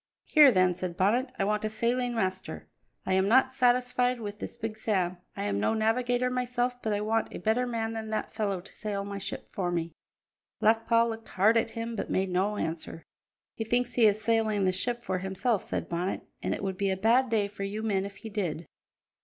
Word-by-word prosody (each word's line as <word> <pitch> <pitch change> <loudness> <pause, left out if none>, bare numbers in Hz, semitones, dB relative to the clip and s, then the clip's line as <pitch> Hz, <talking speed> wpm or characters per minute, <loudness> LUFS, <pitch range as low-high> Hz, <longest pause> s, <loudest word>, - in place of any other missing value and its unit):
"Here 300 -3 +7
then," 185 -3 +3
said 175 -1 -5
Bonnet, 240 +7 +2
"I - - +1
want 210 +1 0
a 215 - 0
sailing 240 +3 0
master. 190 -4 -3 0.4
I 190 - 0
am 190 +1 +3
not 260 +4 +5
satisfied 250 -1 +2
with 210 -2 -6
this - - -6
Big 225 -2 -4
Sam. 185 -5 0 0.2
I - - -2
am 100 -1 -1
no 105 - +1
navigator 245 +3 +1
myself, 245 0 -1
but 220 - -1
I 205 0 0
want 225 +1 0
a - - -6
better 235 +3 +1
man 225 -2 -2
than 220 -1 -5
that 215 - -3
fellow 200 -4 -1
to 190 - -14
sail 205 -2 -3
my 200 0 -5
ship 195 - -6
for 180 -3 -2
me." 170 -1 -2 0.7
Black 225 +1 +3
Paul 230 0 +4
looked 225 0 -6
hard 210 +5 +3
at 230 0 +2
him 230 0 -3
but - - -4
made 190 0 0
no 195 +4 +1
answer. 165 -1 -4 0.5
"He 225 - -3
thinks 245 +2 0
he 230 -3 +5
is 205 0 +2
sailing 220 -2 +1
the 185 - +3
ship 240 +6 -1
for 185 -3 -1
himself," 190 +4 0
said - - -4
Bonnet, 175 +3 -2 0.2
"and - - -1
it - - -7
would 190 -1 -2
be 200 0 0
a 190 - 0
bad 235 +6 +3
day 215 -3 +2
for 200 0 -11
you 205 +2 -3
men 200 -3 +1
if 200 0 -7
he 220 - -9
did." 175 -6 -2
215 Hz, 220 wpm, -29 LUFS, 190-235 Hz, 0.7 s, Here